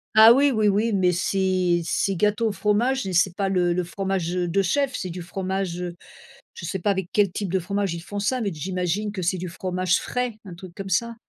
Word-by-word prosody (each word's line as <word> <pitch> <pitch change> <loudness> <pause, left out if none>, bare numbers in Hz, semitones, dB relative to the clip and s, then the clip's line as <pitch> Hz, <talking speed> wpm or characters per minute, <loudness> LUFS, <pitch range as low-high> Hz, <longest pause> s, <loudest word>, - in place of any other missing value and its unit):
Ah 220 +1 +9
oui, 280 +3 +4
oui, 215 -5 +2
oui, 215 +3 +1
mais 185 -3 +3
c'est 185 -1 +1
c'est 195 +3 0
gâteau 210 +4 +1
au - - 0
fromage 220 +5 +1
mais 190 - -3
c'est 180 0 +2
pas 195 0 0
le 180 -2 +2
le 180 - 0
fromage 190 -1 -2
de 180 +1 +1
chef, 265 +8 0
c'est 185 -4 -4
du 180 +1 -6
fromage, 185 0 -3
heu, 175 -1 -5 0.6
je - - -9
sais 185 +3 -3
pas 205 - +1
avec 190 -3 -2
quel 205 -3 +3
type 190 -1 -4
de 190 - +2
fromage 195 0 -2
ils 170 - -6
font 205 +3 -6
ça 250 +6 0
mais 210 -4 -1
j'imagine 180 +5 -2
que 190 -3 -5
c'est 180 +2 0
du 180 +1 -4
fromage 185 +1 0
frais, 250 -1 -2
un 185 -3 -9
truc 175 0 -11
comme 195 +1 -6
ça. 235 +3 0
190 Hz, 235 wpm, -24 LUFS, 180-210 Hz, 0.6 s, Ah